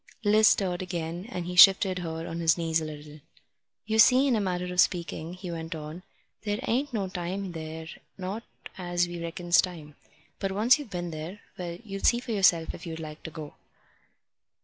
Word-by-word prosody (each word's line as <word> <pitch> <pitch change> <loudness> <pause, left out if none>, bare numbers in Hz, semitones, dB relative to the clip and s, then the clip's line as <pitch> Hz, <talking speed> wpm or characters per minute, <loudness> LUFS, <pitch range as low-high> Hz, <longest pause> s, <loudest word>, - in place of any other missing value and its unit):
Liz 215 +1 +5
stirred 180 -3 +2
again, 175 +1 -4
and 180 -8 -4
he 180 +1 -5
shifted 190 0 +7
her 165 -1 -5
on 165 - -5
his 165 -1 +3
knees 165 -1 0
a - - -3
little. 150 0 -9 0.7
"You 220 +1 0
see, 255 +4 +7
in 265 -4 +3
a 215 - +1
manner 180 -2 -2
of 180 - +5
speaking," 170 -1 -1
he 180 -1 -7
went 165 0 -5
on, 155 +3 -7 0.4
"there 205 -1 -2
ain't 275 +5 0
no 205 -5 -1
time 185 +1 -4
there, 160 -1 -7 0.3
not 195 +4 -4 0.4
as 175 -1 0
we 175 -1 -6
reckons 175 +1 +2
time. 160 -5 -7 0.5
But 195 -1 -2
once 230 +8 +4
you've 285 -6 -8
been 175 -2 -4
there 160 +6 -7
well, 170 -1 -5
you'll 195 -2 -6
see 240 - +4
for 245 - -7
yourself 180 -6 +3
if 170 - -9
you'd 165 0 -5
like 155 -1 -8
to - - -7
go." 150 -1 -8
175 Hz, 195 wpm, -28 LUFS, 165-195 Hz, 0.7 s, shifted